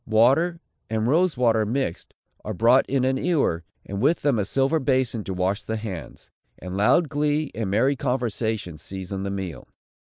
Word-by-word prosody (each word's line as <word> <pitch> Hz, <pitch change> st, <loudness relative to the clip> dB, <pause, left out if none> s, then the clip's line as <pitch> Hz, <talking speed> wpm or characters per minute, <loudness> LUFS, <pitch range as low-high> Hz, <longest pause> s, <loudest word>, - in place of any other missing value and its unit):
Water, 135 Hz, +10 st, +3 dB, 0.3 s
and 110 Hz, 0 st, 0 dB
rose 165 Hz, +4 st, +2 dB
water 115 Hz, -3 st, +3 dB
mixed, 110 Hz, -5 st, -3 dB, 0.3 s
are 110 Hz, -, -4 dB
brought 120 Hz, +7 st, +4 dB
in 130 Hz, -1 st, +1 dB
an 130 Hz, 0 st, +1 dB
ewer, 140 Hz, -, +1 dB, 0.2 s
and 100 Hz, +1 st, -5 dB
with 155 Hz, +7 st, +2 dB
them 140 Hz, -6 st, +2 dB
a 100 Hz, -, 0 dB
silver 135 Hz, +8 st, +1 dB
bason 130 Hz, -5 st, 0 dB
to -, -, -4 dB
wash 95 Hz, +3 st, 0 dB
the 110 Hz, -, -3 dB
hands; 100 Hz, -7 st, -8 dB, 0.3 s
and 90 Hz, +1 st, -7 dB
loud 105 Hz, -, +3 dB
glee 150 Hz, +1 st, 0 dB
and 110 Hz, -4 st, -3 dB
merry 125 Hz, +8 st, +2 dB
conversation 115 Hz, -, -2 dB
season 95 Hz, +3 st, -6 dB
the 100 Hz, -, -3 dB
meal. 95 Hz, -4 st, -5 dB
115 Hz, 175 wpm, -24 LUFS, 100-135 Hz, 0.3 s, brought